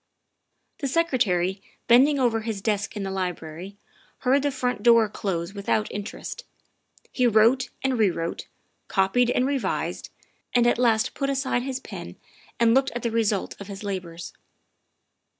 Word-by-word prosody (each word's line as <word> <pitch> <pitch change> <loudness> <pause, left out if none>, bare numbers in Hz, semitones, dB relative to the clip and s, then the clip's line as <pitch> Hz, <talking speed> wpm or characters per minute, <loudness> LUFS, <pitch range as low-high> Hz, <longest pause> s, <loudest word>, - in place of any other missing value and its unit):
The 280 - -2
Secretary, 215 - +1 0.3
bending 270 +5 +6
over 240 -4 +2
his 220 -2 -4
desk 205 +1 -2
in 205 - -3
the 195 - -3
library, 180 0 -5 0.4
heard 265 +2 +3
the 285 - +1
front 250 -5 -2
door 230 -1 +6
close 190 -3 -3
without 210 +1 -1
interest. 205 - -6 0.7
He 250 -1 +2
wrote 235 +3 +4
and 265 -3 0
rewrote, 170 -5 0 0.4
copied 210 +6 +2
and 250 +1 +2
revised, 275 -2 -2 0.5
and 240 -1 +5
at 240 0 +3
last 225 -3 +2
put 275 -1 -2
aside 270 -2 0
his 260 0 -3
pen - - -9 0.4
and 230 -1 +5
looked 265 +1 +3
at 240 - -4
the 235 - 0
result 220 -3 0
of 200 - -7
his 200 0 -8
labors. 180 -4 -5
225 Hz, 150 wpm, -25 LUFS, 195-255 Hz, 0.7 s, bending